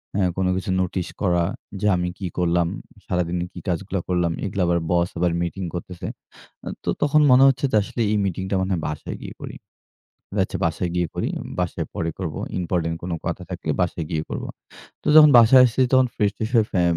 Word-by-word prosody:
হ্যাঁ? 95 -3 +2
কোন 95 - +1
কিছু 95 0 -3
নোটিশ 90 -1 -2
করা 90 -3 +2 0.4
যে 105 - +2
আমি 90 0 -1
কি 95 - -3
করলাম? 85 -1 +2 0.4
সারাদিন 90 -1 -1 0.2
কি 90 - -8
কাজগুলা 95 +1 -2
করলাম? 90 -2 +1
এগুলো 100 -1 -2
আবার 85 0 +2
বস 85 0 +2
আবার 90 0 +2
মিটিং 90 +2 -3
করতেছে। 90 0 -6 0.8
তো - - -3
তখন 150 +1 +4
মনে 130 +1 +7
হচ্ছে 135 +1 +2
যে - - +1
আসলে, 120 - -4
"এই - - +2
মিটিংটা 95 +1 -2
মনে 95 +1 -1
হয় 85 - -1
বাসায় 75 -1 -5
গিয়ে - - -8
করি। - - -7 0.8
ও - - -5
আচ্ছা - - -5
বাসায় 85 +1 -2
গিয়ে 90 -1 +1
করি। - - -1 0.3
বাসায় 85 -2 -2
পরে 85 -5 -2
করব। 85 -5 -4 0.3
ইম্পোর্টেন্ট 85 -2 -1
কোন 90 -1 -4
কথা - - -3
থাকলে - - -4
বাসায় 85 -2 -2
গিয়ে 80 -2 -1
করবো।" - - -4 0.5
তো - - -14
যখন 150 -1 +9
বাসায় 120 +3 +7
আসছি 120 +2 -2
তখন 130 -1 +5
ফ্রেশ-ট্রেশ 105 +1 -1
হয়ে 110 -2 +4
ফে 90 -3 +2
90 Hz, 195 wpm, -23 LUFS, 85-105 Hz, 0.8 s, যখন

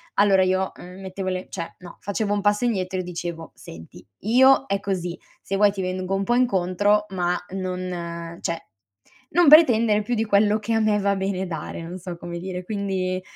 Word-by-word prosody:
allora 195 -2 +5
io, 185 +1 +1
uhm, 180 +2 -11
mettevo 190 0 -4
le 185 0 -4
cioè 165 - -6
no, 175 -2 -12
facevo 205 +1 -1
un 205 - 0
passo 205 +3 +2
indietro 190 -5 -1
e - - -2
dicevo: 170 -2 -6
"Senti, 80 +2 -12 0.2
io 260 +5 +5
è 200 - 0
così 180 -3 -3 0.2
se 195 - -3
vuoi 205 0 +5
ti 195 -1 -5
vengo 185 +1 -3
un 195 - -1
po' 240 - +2
incontro 205 -3 +2
ma 180 -2 0 0.2
non 175 -2 -5
cioè 165 -1 -3 0.7
non 350 -3 +4
pretendere 235 -9 +6
più 245 +4 -2
di 225 - +1
quello 210 +1 +3
che 225 +2 -2
a 225 - +2
me 215 -1 +2
va 200 0 +1
bene 190 -1 -2
dare." 165 -1 -6
Non 170 +2 -7
so 180 -1 -6
come 170 0 -6
dire, 180 0 -5
quindi 190 -2 -2
190 Hz, 195 wpm, -23 LUFS, 180-210 Hz, 0.7 s, pretendere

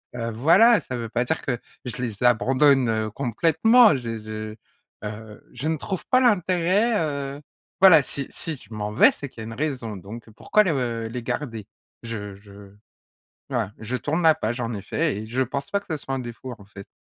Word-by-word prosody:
heu, 115 -1 -3
voilà, 180 - +5
ça 125 - -6
veut 115 -1 -5
pas 120 +2 0
dire 160 +6 -1
que 125 -3 -2 0.3
je 125 0 -5
les 115 -3 -4
abandonne, 130 +2 +4
heu, 110 -1 -1
complètement, 165 - +4
je 115 -3 -5
je, 110 0 -7 0.5
heu, 105 0 -8
je 125 +5 -4
ne 160 - 0
trouve 185 +5 -5
pas 255 - +4
l'intérêt, 190 0 +2
heu, 140 -2 -3 0.4
voilà, 180 -5 +9
si 140 0 -4
si 160 -3 -4
je 110 - -14
m'en 105 -1 -4
vais, 105 - +6
c'est 140 - -8
qu'il 120 - -15
y - - -5
a - - -7
une 115 - -7
raison, 125 -5 -3
donc 110 +5 -10
pourquoi 215 - +2
les, 185 - +1
heu, 120 -5 -2
les 120 +1 -6
garder? 120 -4 -4 0.4
Je 105 -4 -6
je 100 0 -15 0.8
voilà, 115 -6 -2
je 110 +4 -3
tourne 155 +6 -1
ma 160 -2 +6
page, 120 -3 -3
en 115 0 -3
effet 110 - -2
et 110 - -6
je 125 +4 -1
pense 140 +2 -3
pas 200 - +1
que - - -23
ce 160 - -1
soit 135 -1 -6
un - - -3
défaut 125 +1 -7
en 100 - -15
fait. 100 -1 -12
125 Hz, 210 wpm, -24 LUFS, 110-155 Hz, 0.8 s, voilà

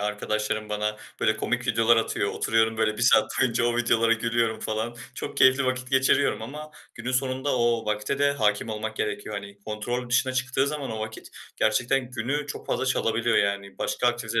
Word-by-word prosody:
arkadaşlarım 105 +1 -2
bana, 105 0 -2 0.2
böyle, - - +2
komik 125 +1 -2
videolar 115 -1 +4
atıyor, 110 -2 0
oturuyorum, 110 0 +1
böyle, 110 -1 +1
1 - - -3
saat 125 - +5
boyunca 120 -2 +2
o 120 0 +1
videolara 115 -1 +3
gülüyorum 115 0 0
falan, 110 +2 -3 0.2
çok - - -6
keyifli 130 +1 +5
vakit 130 0 -2
geçiriyorum 130 -2 +3
ama 150 +6 -8 0.2
günün 120 +2 -4
sonunda 130 +1 0
o 120 -1 +1
vakte 105 +5 -1
de 140 0 +3
hâkim 105 -4 0
olmak 110 0 -4
gerekiyor. 105 0 -3
Hani, 100 0 -7
kontrol 120 +3 -3
dışına 125 +2 +2
çıktığı 130 +1 0
zaman 145 -3 -3
o 110 - -4
vakit 110 0 -7 0.3
gerçekten 125 0 +1
günü 130 +5 -2
çok 145 - -7
fazla - - -1
çalabiliyor, 115 -2 +1
yani. 100 -1 0
Başka 125 - -1
aktivitel 115 -1 0
115 Hz, 180 wpm, -26 LUFS, 110-130 Hz, 0.3 s, saat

